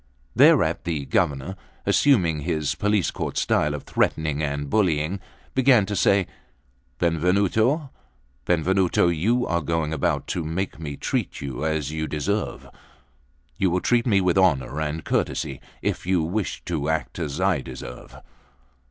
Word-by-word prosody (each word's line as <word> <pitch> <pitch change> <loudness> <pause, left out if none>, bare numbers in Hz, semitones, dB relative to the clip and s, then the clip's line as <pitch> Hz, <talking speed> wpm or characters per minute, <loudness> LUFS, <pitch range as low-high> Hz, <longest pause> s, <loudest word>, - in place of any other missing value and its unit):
Thereat - - +5
the 80 -5 -2
Governor, 70 +7 0 0.3
assuming 90 - +3
his 75 -1 -1
police 105 -3 +1
court - - -4
style 75 -1 +1
of 75 - -7
threatening 75 -2 0
and 70 -1 -2
bullying, 85 -1 +1 0.3
began 130 -5 +4
to 105 - -3
say: 100 0 +3 0.7
"Benvenuto, 100 - +1 0.5
Benvenuto, 90 +1 +2
you 110 +10 +1
are 85 0 0
going 80 0 -1
about 80 -3 0
to 85 - -2
make 85 +5 -3
me 75 -3 -6
treat - - -2
you 70 +1 -5
as 80 -3 -1
you 80 0 -3
deserve." 100 +9 -2 0.9
"You 95 - +2
will 90 +2 +1
treat 120 +5 +1
me 100 -4 +4
with 90 0 +2
honour 75 -5 +2
and 80 +1 -3
courtesy, 65 -2 -1 0.2
if - - -2
you 90 -3 +2
wish 95 +5 -3
to 80 -4 -2
act 80 +2 -2
as 75 -1 -3
I 95 -6 +2
deserve." 60 - -9
85 Hz, 145 wpm, -24 LUFS, 75-95 Hz, 0.9 s, Thereat